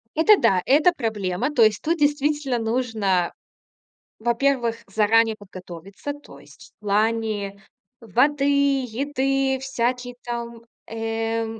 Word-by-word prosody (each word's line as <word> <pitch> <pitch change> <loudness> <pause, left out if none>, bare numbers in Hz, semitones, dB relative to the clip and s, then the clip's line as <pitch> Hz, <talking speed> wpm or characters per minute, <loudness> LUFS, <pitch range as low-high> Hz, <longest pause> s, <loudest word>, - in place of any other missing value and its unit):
Это 365 +7 +6
да, 185 - +3
это 300 +6 +5
проблема. 220 - -2
То 235 - +5
есть 215 -1 +3
тут 335 +2 0
действительно 290 -3 +1
нужно, 220 -6 0 0.9
во-первых, 235 0 +1
заранее 220 +2 +3
подготовиться. 190 - -9
То 290 - -14
есть - - -17
в 210 - -18
плане 210 -1 0 0.4
воды, 275 +7 +1 0.4
еды, 270 +2 -1
всякие 250 -1 -2
там, 235 -1 -6 0.2
э, 225 0 -2
230 Hz, 110 wpm, -23 LUFS, 215-270 Hz, 0.9 s, Это